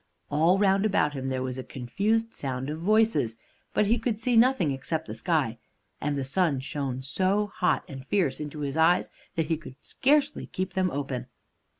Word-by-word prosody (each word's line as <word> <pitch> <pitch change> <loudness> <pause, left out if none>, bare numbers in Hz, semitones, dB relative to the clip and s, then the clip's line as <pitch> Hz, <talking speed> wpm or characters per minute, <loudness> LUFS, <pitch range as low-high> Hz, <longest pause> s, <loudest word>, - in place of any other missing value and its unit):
All 165 +6 +4
round 195 0 +3
about 170 -9 +2
him 135 -1 -3
there 130 -1 -1
was 130 0 -4
a - - -4
confused 210 - -1
sound 130 0 -3
of 155 - -5
voices, 215 - +2 0.3
but 210 - +2
he 230 +4 +2
could 230 -4 -1
see 235 +2 0
nothing 230 - +4
except 155 +4 -3
the - - -6
sky, 145 -10 0 0.4
and 145 -1 -1
the 135 - -1
sun 145 +1 +1
shone 135 -1 -4
so 190 +9 +1
hot 180 - +2
and 135 -2 -8
fierce 180 -10 +1
into 150 0 -6
his 140 +1 -2
eyes 165 +2 +3 0.2
that 165 - +1
he 160 0 0
could 150 -5 -11
scarcely 290 - +1
keep 185 0 -4
them 185 0 +1
open. 135 -4 -4
160 Hz, 190 wpm, -27 LUFS, 135-200 Hz, 0.4 s, All